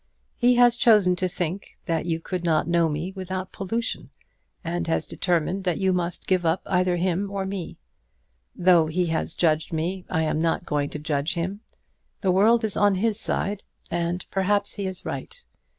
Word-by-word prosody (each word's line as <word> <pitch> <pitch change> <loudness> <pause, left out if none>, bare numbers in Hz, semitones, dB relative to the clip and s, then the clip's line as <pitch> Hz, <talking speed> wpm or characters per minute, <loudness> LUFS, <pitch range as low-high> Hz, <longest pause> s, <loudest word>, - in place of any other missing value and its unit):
He 245 0 +3
has 240 -1 +5
chosen 210 -7 +5
to 185 - 0
think 180 +1 -4
that 165 -1 -1
you 165 -1 0
could 180 +1 -4
not 160 -2 +1
know 170 -1 +2
me 160 +5 -3
without 185 0 -5
pollution, 225 +5 -3 0.5
and 170 0 -2
has 165 - 0
determined 180 +2 -1
that 180 -2 +1
you 190 -1 +1
must 175 -1 -2
give 185 -2 +1
up 165 +2 +1
either 180 -1 +1
me 185 +2 0
or 195 -1 -3
him. 190 -3 -5 0.8
Though 175 -3 +4
he 175 +3 0
has 160 -1 -1
judged 155 -2 +1
me 175 +4 -2
I 160 -3 0
am 155 0 0
not 165 +1 0
going 145 -1 -1
to - - -6
judge 150 0 -1
him. 185 +5 -3 0.6
The 190 - +2
world 220 +5 +4
is 215 -3 +2
on 205 -1 +3
his 215 +2 +2
side; 200 -1 0 0.3
and, 170 +1 -2
perhaps, 200 +1 +1
he 200 -2 -3
is 185 -1 -4
right. - - -6
180 Hz, 180 wpm, -25 LUFS, 165-195 Hz, 0.8 s, has